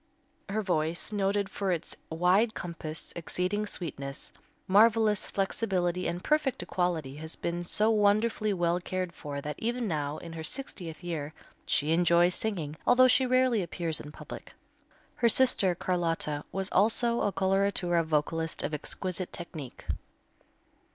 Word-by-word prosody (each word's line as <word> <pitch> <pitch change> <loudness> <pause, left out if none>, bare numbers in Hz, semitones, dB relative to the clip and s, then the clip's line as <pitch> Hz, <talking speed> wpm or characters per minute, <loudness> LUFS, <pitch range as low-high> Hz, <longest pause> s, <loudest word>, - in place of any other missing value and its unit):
Her 215 +2 -1
voice, 170 0 0
noted 200 -1 +1
for 195 0 -2
its 170 -3 -3
wide 180 +7 +3
compass, 165 -3 -5
exceeding 185 +5 -1
sweetness, 140 -7 -5 0.4
marvelous 215 +1 +4
flexibility 185 -3 0
and 175 +2 -3
perfect 300 -4 +1
equality, 165 -7 -1
has 160 +1 -6
been 175 0 -3
so 210 +5 +2
wonderfully 215 +1 +2
well 175 -2 +1
cared 185 -1 -3
for 145 -3 -6
that 150 0 -5
even 240 +1 -1
now, 150 -3 -2
in 165 -1 -8
her 160 -1 -6
sixtieth 175 - -5
year, 160 -3 -4 0.3
she 150 +2 +2
enjoys 175 +1 +4
singing, 165 -10 -2
although 255 +1 +7
she 255 +1 +4
rarely 255 -3 +3
appears 170 -3 -3
in 150 - -9
public. - - -10 0.6
Her 235 - +4
sister, 205 -7 +4
Carlotta, 165 -5 -1
was 195 +1 -2
also 235 +4 +3
a 205 - +1
coloratura 190 -3 +1
vocalist 160 +1 -1
of 155 - -2
exquisite 185 +4 -4
technique. 160 -6 -8
180 Hz, 140 wpm, -29 LUFS, 165-210 Hz, 0.6 s, although